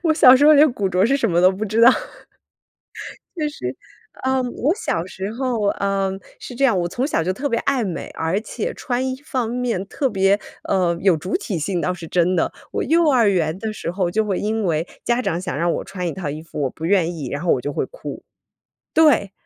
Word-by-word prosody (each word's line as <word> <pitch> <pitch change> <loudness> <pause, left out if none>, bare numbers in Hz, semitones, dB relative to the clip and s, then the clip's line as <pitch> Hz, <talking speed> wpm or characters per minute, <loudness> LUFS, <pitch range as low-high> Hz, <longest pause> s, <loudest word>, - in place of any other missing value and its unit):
我 320 -3 +3
小 255 -5 +8
时 290 - +4
候 305 - +8
连 295 +1 +6
古 200 -5 -1
着 185 +1 +2
是 275 +4 +3
什 230 -7 0
么 170 - +2
都 185 +1 +6
不 195 +3 -4
知 215 +2 0
道。 235 - +9 1.5
就 310 -3 -1
是， 125 - -5 0.5
嗯， 260 -1 +1
我 295 +7 +1
小 170 - -2
时 190 +2 -6
候 235 -4 -1
嗯， 195 -1 -1 0.2
是 - - -8
这 270 +3 +2
样， 230 -7 +3
我 175 - 0
从 245 +10 -2
小 165 - 0
就 185 - -1
特 280 +9 -3
别 230 - +1
爱 275 -3 +1
美， 185 -5 -4
而 165 +5 -1
且 220 0 -4
穿 250 +1 -2
衣 260 - -2
方 255 -7 -2
面 235 -6 -2
特 270 +4 -1
别， 195 -1 +2 0.2
呃， 180 -3 +1
有 190 -3 +4
主 180 +6 -3
体 220 - -4
性 175 +3 -2
倒 180 - 0
是 175 -2 -9
真 180 +2 +2
的。 170 - +1 0.2
我 - - -1
幼 330 -1 +3
儿 245 -6 +4
园 165 -3 0
的 220 +2 -4
时 180 - -5
候， 180 -1 -1
就 220 +2 +1
会 195 -3 -1
因 220 0 -1
为 165 -1 0 0.2
家 240 +1 +1
长 170 -8 -1
想 180 -5 -4
让 170 +2 +1
我 - - -3
穿 180 -2 -5
一 165 - -2
套 175 -7 -4
衣 155 +2 -5
服， 150 -2 -6
我 135 - 0
不 160 +5 -7
愿 175 -2 +2
意， 145 -6 -5
然 145 - -4
后 175 - +1
我 125 - -1
就 145 - -3
会 - - -1
哭。 - - -9 0.7
对， 290 -11 +4
195 Hz, 255 characters per minute, -21 LUFS, 175-250 Hz, 1.5 s, 道